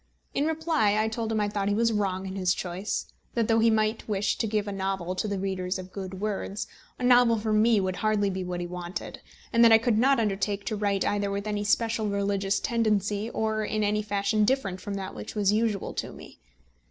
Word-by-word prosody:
In 290 - +1
reply 315 -10 +1
I 215 +1 +2
told 225 0 -3
him 220 - +1
I 210 - +1
thought 205 -1 -2
he 205 - +1
was 230 +1 +2
wrong 195 -2 -1
in 190 0 -5
his 185 -2 +1
choice; 185 +3 -3 0.3
that 230 -2 +1
though 225 0 +3
he 230 +1 +5
might 220 0 0
wish 205 -1 +1
to 225 - 0
give 210 -1 -1
a - - -2
novel 190 -2 -2
to 185 +3 -2
the 200 -1 -2
readers 190 -1 -2
of 185 0 -9
Good 190 -1 -6
Words, 210 0 -3 0.3
a - - -6
novel 245 -2 +5
from 215 0 +1
me 225 -1 +4
would 185 -1 -1
hardly 210 -2 +1
be 185 0 -3
what 180 -1 -4
he - - -3
wanted, 180 +2 -6 0.3
and 235 0 +5
that 230 - +7
I 225 - +9
could 225 -1 +1
not 270 +2 +4
undertake 200 -1 -1
to 220 - -2
write 200 -2 0
either 205 -1 0
with 200 +1 -3
any 210 -1 -2
specially 220 +1 +1
religious 200 0 0
tendency, 215 -2 0
or 220 -1 -1
in 215 0 -1
any 210 +1 +1
fashion 205 0 0
different 210 -6 0
from 205 -2 -4
that 190 -1 -5
which 105 - -8
was 205 -1 +2
usual 215 -2 0
to - - -4
me. - - -13
210 Hz, 225 wpm, -27 LUFS, 195-220 Hz, 0.3 s, I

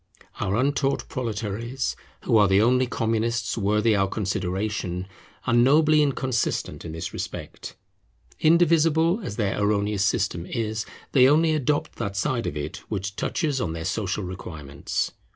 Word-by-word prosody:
Our 95 - 0
untaught 140 +2 0
proletaries, 115 +2 -3 0.3
who - - +2
are 105 -1 +6
the 95 +1 +4
only 125 +3 +3
Communists 115 0 -1
worthy 105 +1 +2
our 95 -1 +2
consideration, 95 -1 -2 0.4
are - - +1
nobly 150 +6 +5
inconsistent 130 -4 -1
in 80 - -6
this 80 +1 -5
respect. - - -6 0.6
Indivisible 165 +2 +4
as 105 - -5
their 105 -2 -1
erroneous 100 -1 +1
system 95 -4 0
is, 110 -2 -3 0.2
they 130 -1 +6
only 160 +2 +4
adopt 150 +1 -1
that 100 -4 -3
side 120 +4 0
of 75 - -3
it 75 - -4
which 100 -1 -3
touches 145 - -1
on 80 -2 -2
their 80 0 -5
social 100 +1 -2
requirements. 75 -6 -4
110 Hz, 140 wpm, -25 LUFS, 95-130 Hz, 0.6 s, are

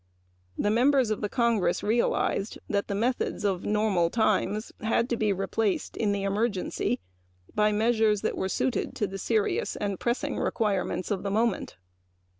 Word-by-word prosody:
The 205 - +1
members 255 0 +3
of 215 - -2
Congress 235 -7 +1
realized 215 -1 0
that 200 -1 -1
the 200 - -2
methods 235 0 -1
of 190 -3 0
normal 210 -5 +2
times 215 0 +1
had 225 +2 +1
to - - +3
be 215 -2 +1
replaced 195 +1 -1
in 210 -3 +1
the 200 -1 -1
emergency 200 - -1 0.5
by 210 0 +3
measures 220 -1 +2
which - - 0
were 190 - -2
suited 255 +5 -1
to 210 - 0
the 195 0 -6
serious 220 +1 0
and 200 -2 -3
pressing 265 +4 -1
requirements 195 -4 -1
of 195 -2 0
the 200 - -2
moment. 225 - 0
210 Hz, 155 wpm, -27 LUFS, 195-230 Hz, 0.5 s, members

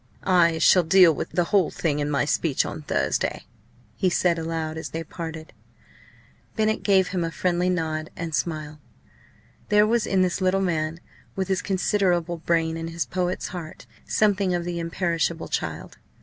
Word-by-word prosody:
"I 170 -3 +4
shall 170 +3 +5
deal 175 0 +6
with - - -4
the 175 - +1
whole 185 -1 +2
thing 150 -3 -1
in 145 0 -1
my 140 -1 +1
speech 150 -1 +1
on - - -6
Thursday!" 145 - -1 0.5
he 185 - +1
said 170 -1 +1
aloud, 160 -1 -3
as 160 - -5
they 165 0 -4
parted. 160 -1 -8 1.0
Bennett 220 -1 +1
gave 190 -2 +3
him 180 -2 -1
a 165 - -1
friendly 180 +1 0
nod 160 -3 -2
and 165 -1 -5
smile. 155 0 -3 0.9
There 210 0 +5
was 230 +1 +1
in 190 -1 +2
this 185 +1 -1
little 185 +1 +2
man, 165 -3 -1 0.4
with 190 -1 -2
his 190 -1 +1
considerable 180 -3 0
brain 165 -1 0
and 165 0 -5
his 170 0 -2
poet's 180 0 -2
heart, 170 -3 -8 0.2
something 200 -3 +2
of 175 -1 -2
the 175 -1 -3
"imperishable 170 -1 -1
child." - - -4
170 Hz, 165 wpm, -24 LUFS, 160-185 Hz, 1.0 s, deal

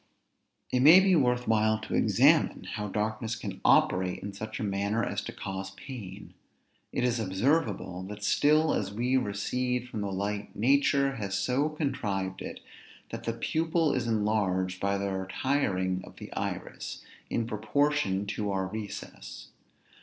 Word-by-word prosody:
It 125 - +2
may 155 +8 +9
be 190 -1 +4
worth 125 -4 +2
while 110 0 +3
to - - -6
examine - - +4
how 105 0 -3
darkness 110 +2 -2
can - - -7
operate 90 0 +3
in 100 0 -5
such 110 +2 -6
a - - -2
manner 100 +3 0
as - - -2
to - - -5
cause 95 0 -5
pain. 105 -6 -9 0.6
It - - -1
is 120 -1 +1
observable, 105 - 0
that 105 0 -8
still 155 +7 +3
as 100 -2 -1
we 120 +5 0
recede 125 +2 -1
from 110 -3 -5
the 100 -1 -2
light, 100 +2 -3
nature 140 +3 +3
has 100 -2 -2
so 130 +8 +1
contrived 100 - -2
it, - - -7 0.5
that - - -6
the 115 - 0
pupil 160 +6 +1
is 125 -3 -1
enlarged 100 -4 0
by 100 0 0
the 100 0 -2
retiring 95 -1 0
of - - -13
the - - -9
iris, - - -5 0.3
in 115 - 0
proportion 110 -2 0
to 105 0 -3
our 95 -1 0
recess. 105 +1 -7
110 Hz, 155 wpm, -29 LUFS, 100-125 Hz, 0.6 s, may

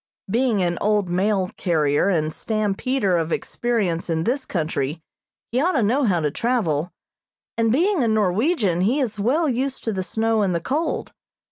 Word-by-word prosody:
Being 225 -1 +1
an 175 -1 -1
old 205 -3 +1
mail 190 +1 +1
carrier 155 0 +1
and 155 -4 0
stampeder 215 -1 0
of 165 0 -2
experience 200 -9 -1
in 160 -1 0
this 260 +6 -1
country, 155 -3 -2 0.5
he 250 +3 +1
ought 360 +4 +2
to 260 - +2
know 255 +7 +2
how 180 -6 +2
to 150 -2 0
travel, 180 - 0 0.6
and, 225 -1 +2
being 340 - +2
a - - +2
Norwegian, 210 - +1
he 235 +10 +2
is 225 -6 -2
well 285 +10 +2
used 265 +1 -2
to 225 - -1
the 190 - -2
snow 220 +3 0
and 190 -3 +1
the - - +1
cold. 295 - -2
210 Hz, 170 wpm, -22 LUFS, 175-245 Hz, 0.6 s, ought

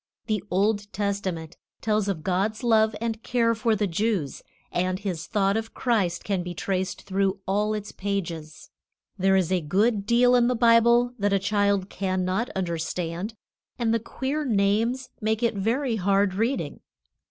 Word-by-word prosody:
The 210 -4 -1
Old 205 +2 +1
Testament 190 -5 -3 0.2
tells 215 -2 0
of 180 -6 -2
God's 200 +6 0
love 220 -2 +3
and 225 -1 -3
care 230 -1 +2
for 225 0 +1
the 210 0 0
Jews, 190 - -1 0.3
and 185 +1 0
His 185 -5 -4
thought 200 -2 +1
of 225 0 -4
Christ 200 -9 0
can 195 -3 -1
be 175 0 -6
traced 190 +1 -2
through 195 0 0
all 210 +2 +1
its 210 -1 -5
pages. 170 -6 -5 0.5
There 190 +1 +4
is 185 -2 +1
a 185 -2 +2
good 200 +6 +1
deal 245 +1 +5
in 240 -1 +5
the 250 - +1
Bible 235 +1 +4
that 200 0 +1
a - - +5
child 200 -1 +1
cannot 185 +3 -1
understand, 170 +2 -3 0.4
and 230 -2 +1
the 230 - +2
queer 270 +6 -3
names 225 +2 +1
make 220 +2 0
it 235 - +2
very 230 +4 0
hard 195 0 +2
reading. 220 - -1
205 Hz, 160 wpm, -25 LUFS, 185-225 Hz, 0.5 s, deal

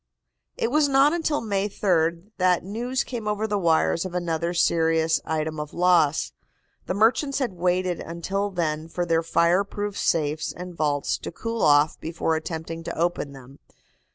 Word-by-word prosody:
It 230 - -1
was 300 0 +3
not 275 +3 +5
until 320 -3 0
May 205 -2 -1
3d 170 -1 0
that 180 -1 +3
news 240 +7 -2
came 230 -4 -6
over 210 +1 0
the 205 -2 -1
wires 165 -1 +2
of 185 -1 -6
another 170 -1 -1
serious 165 -2 +2
item 155 0 -2
of 150 0 -6
loss. 170 - +3 0.6
The 185 - -1
merchants 245 +7 +2
had 260 -8 -1
waited 180 0 0
until 190 +5 -3
then 160 -4 -2
for 175 +1 -3
their 165 -1 +2
fire 170 +3 +2
proof 205 0 -5
safes 155 -3 0
and 180 0 -8
vaults 145 -3 -1
to - - -6
cool 230 +6 -4
off 145 +1 +4
before 160 0 -1
attempting 165 +1 -5
to - - -5
open 165 -4 -1
them. 135 +1 -14
175 Hz, 165 wpm, -24 LUFS, 160-205 Hz, 0.6 s, not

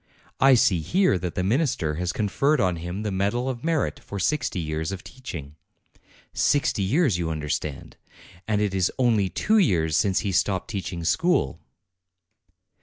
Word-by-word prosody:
I 135 -1 +6
see 100 -7 +3
here 180 - +2
that 90 -1 -4
the 90 - -1
minister 110 - 0
has 90 +3 -2
conferred 135 +10 +1
on 90 -4 +1
him 90 +5 -5
the 105 - -2
medal 100 +7 0
of 125 -2 -4
merit 160 -2 0
for 100 - -8
sixty 130 -1 0
years 80 0 -3
of 95 -1 -6
teaching. 80 - -9 0.8
Sixty 140 -6 +1
years, 115 - +2
you 85 -2 -1
understand! 75 -2 -4 0.5
And 105 -1 +1
it 105 -2 0
is 95 -2 +1
only 115 -7 +2
two 215 - +2
years 80 - +2
since 95 +2 +2
he 100 - -2
stopped 95 +3 0
teaching 90 -4 -4
school. 85 - +1
95 Hz, 160 wpm, -25 LUFS, 85-125 Hz, 0.8 s, I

